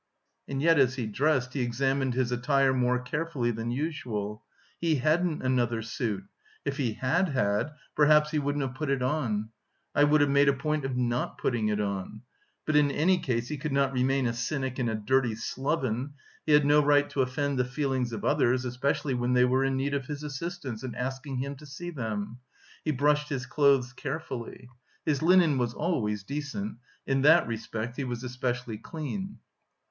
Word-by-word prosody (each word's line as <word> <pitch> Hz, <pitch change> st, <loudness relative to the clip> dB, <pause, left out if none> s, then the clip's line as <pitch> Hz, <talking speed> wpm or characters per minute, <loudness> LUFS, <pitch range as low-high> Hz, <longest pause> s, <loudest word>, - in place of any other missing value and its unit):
And 135 Hz, +1 st, -3 dB
yet 165 Hz, -2 st, +5 dB
as 130 Hz, -1 st, +4 dB
he 125 Hz, -4 st, -2 dB
dressed 130 Hz, +3 st, +1 dB
he 135 Hz, -, -1 dB
examined 135 Hz, +1 st, 0 dB
his 125 Hz, -1 st, 0 dB
attire 135 Hz, +2 st, +2 dB
more 125 Hz, -1 st, +2 dB
carefully 125 Hz, -1 st, -2 dB
than 115 Hz, +1 st, -4 dB
usual. 120 Hz, -7 st, -3 dB, 0.4 s
He 165 Hz, -2 st, +2 dB
hadn't 155 Hz, +4 st, +1 dB
another 120 Hz, -3 st, +1 dB
suit 110 Hz, -3 st, -3 dB, 0.4 s
if 140 Hz, -1 st, -2 dB
he 125 Hz, -7 st, 0 dB
had 165 Hz, -, +1 dB
had, 120 Hz, -2 st, +1 dB, 0.3 s
perhaps 150 Hz, 0 st, +5 dB
he 155 Hz, -, +1 dB
wouldn't 145 Hz, 0 st, -1 dB
have 130 Hz, -2 st, -3 dB
put 145 Hz, +2 st, -3 dB
it 135 Hz, -2 st, +1 dB
on. 115 Hz, -6 st, -1 dB, 0.4 s
"I 145 Hz, -, +5 dB
would 150 Hz, 0 st, +4 dB
have 145 Hz, -, +4 dB
made 140 Hz, 0 st, +5 dB
a -, -, +4 dB
point 150 Hz, +2 st, -1 dB
of 130 Hz, -2 st, -2 dB
not 120 Hz, 0 st, -1 dB
putting 115 Hz, -4 st, 0 dB
it 105 Hz, -1 st, 0 dB
on." 100 Hz, +2 st, -3 dB, 0.4 s
But 155 Hz, -, 0 dB
in 145 Hz, -1 st, +5 dB
any 180 Hz, +6 st, +2 dB
case 120 Hz, -5 st, -1 dB
he 150 Hz, -, -4 dB
could 150 Hz, -1 st, -3 dB
not 140 Hz, -1 st, +2 dB
remain 130 Hz, +1 st, +1 dB
a 115 Hz, -, +1 dB
cynic 130 Hz, +1 st, -2 dB
and 120 Hz, -2 st, +1 dB
a 110 Hz, -, -1 dB
dirty 120 Hz, +2 st, +1 dB
sloven; 130 Hz, +2 st, -2 dB, 0.3 s
he 155 Hz, -, +4 dB
had 150 Hz, -1 st, +6 dB
no 150 Hz, +1 st, +5 dB
right 145 Hz, 0 st, +4 dB
to 135 Hz, -, +1 dB
offend 135 Hz, +1 st, -1 dB
the -, -, +4 dB
feelings 130 Hz, -1 st, -1 dB
of 110 Hz, -3 st, -5 dB
others, 125 Hz, +1 st, +2 dB
especially 130 Hz, +3 st, -1 dB
when 125 Hz, 0 st, 0 dB
they 125 Hz, 0 st, +5 dB
were 130 Hz, +1 st, +2 dB
in 135 Hz, 0 st, +1 dB
need 140 Hz, +2 st, -1 dB
of 140 Hz, -2 st, -2 dB
his 150 Hz, 0 st, -5 dB
assistance 145 Hz, -4 st, -5 dB
and 130 Hz, -2 st, -5 dB
asking 130 Hz, +2 st, -4 dB
him 140 Hz, +2 st, -3 dB
to 150 Hz, -, -13 dB
see 175 Hz, +6 st, -7 dB
them. 110 Hz, -4 st, -4 dB, 0.4 s
He -, -, -2 dB
brushed 150 Hz, +1 st, +2 dB
his 130 Hz, -4 st, -3 dB
clothes 135 Hz, -2 st, +3 dB
carefully. 130 Hz, -4 st, -6 dB, 0.4 s
His 150 Hz, -3 st, +1 dB
linen 165 Hz, -4 st, +5 dB
was 120 Hz, -1 st, -1 dB
always 110 Hz, -, -1 dB
decent; 150 Hz, -, -4 dB, 0.3 s
in 135 Hz, 0 st, +1 dB
that 160 Hz, +5 st, +6 dB
respect 115 Hz, +1 st, -4 dB
he 140 Hz, -, -1 dB
was 120 Hz, -1 st, -4 dB
especially 125 Hz, -3 st, -3 dB
clean. 190 Hz, +5 st, -5 dB
135 Hz, 190 wpm, -28 LUFS, 120-145 Hz, 0.4 s, had